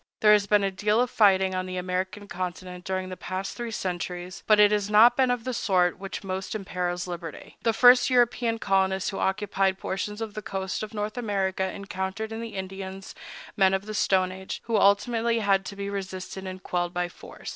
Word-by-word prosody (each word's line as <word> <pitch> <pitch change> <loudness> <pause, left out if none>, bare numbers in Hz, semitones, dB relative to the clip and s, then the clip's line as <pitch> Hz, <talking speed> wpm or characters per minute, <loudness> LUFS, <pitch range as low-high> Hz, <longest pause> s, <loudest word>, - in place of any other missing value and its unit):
There 210 -1 +7
has 205 -1 +3
been 205 -1 +4
a 195 - +1
deal 210 +3 +1
of 250 0 +1
fighting 190 -3 +4
on 185 0 -2
the 185 0 -4
American 185 +3 -3
continent 180 -1 -6
during 185 0 -2
the 185 - -5
past 185 +2 -5
three 240 -1 -4
centuries; 180 -3 -4
but 215 -1 +5
it 210 0 +7
has 205 -1 0
not 225 +3 +7
been 260 -1 +3
of 245 -2 0
the 255 +1 -3
sort 180 -6 +1
which 195 +1 -6
most 190 +2 -4
imperils 180 -3 -3
liberty. 170 -3 -8
The 230 - +2
first 245 +3 +6
European 240 -2 +2
colonists 190 -2 +1
who 195 - -5
occupied 195 -1 0
portions 210 +2 -4
of 225 -2 -5
the 215 - -5
coast 190 -2 -4
of 215 0 -6
North 210 +3 -3
America 190 -4 -1
encountered 200 +2 -4
in 225 +1 -5
the 230 -2 -7
Indians 190 0 -6 0.4
men 190 -1 +4
of 190 +1 -4
the 215 - -6
Stone 190 -3 +2
Age, 190 0 -6
who 230 - -1
ultimately 225 +4 +3
had 195 -3 +2
to 200 - -7
be 200 0 -4
resisted 190 -1 -5
and 185 0 -7
quelled 175 0 -2
by 180 0 0
force. 175 - -11
195 Hz, 205 wpm, -26 LUFS, 185-215 Hz, 0.4 s, There